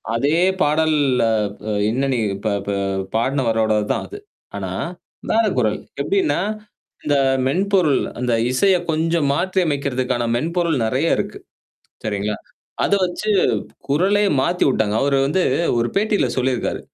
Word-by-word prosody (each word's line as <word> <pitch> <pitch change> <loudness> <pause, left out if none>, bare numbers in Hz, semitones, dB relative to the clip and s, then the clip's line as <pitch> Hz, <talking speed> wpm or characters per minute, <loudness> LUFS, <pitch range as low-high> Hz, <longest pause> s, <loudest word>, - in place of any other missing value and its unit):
அதே 145 +7 +2 0.2
பாடல் 155 +1 +2 0.3
அ - - +2 0.6
என்னா 130 +5 0
நீ 125 - 0 0.2
இப்ப 105 +3 -3 0.2
ப - - -2 0.5
பாடினவரோடது 115 -4 +1
தான் - - -2
அது. 410 - -9 0.4
ஆனா, - - -4 0.6
வேற 225 +1 +3
குரல். 110 -4 +1 0.2
எப்படின்னா? 160 -1 +1 0.6
இந்த 145 -1 +1 0.3
மென்பொருள், 185 -2 +2 0.2
அந்த 125 -1 0 0.2
இசைய 190 +9 +3
கொஞ்சம் 160 -1 +1
மாற்றியமைக்கிறதுக்கான 140 -9 0
மென்பொருள் 165 +4 0
நிறையா 110 - +1
இருக்கு. - - -4 0.7
சரிங்களா. 105 0 -2 0.5
அத - - -1
வச்சு 185 +4 -3 0.6
குரலே 190 +9 +2 0.2
மாத்திவுட்டாங்க. 130 -9 +1
அவரு 140 0 +2
வந்து 180 +6 +1 0.4
ஒரு 120 0 +1
பேட்டியில 205 - +2
சொல்லியிருக்காரு. 130 -1 -1
140 Hz, 115 wpm, -20 LUFS, 120-175 Hz, 0.7 s, வேற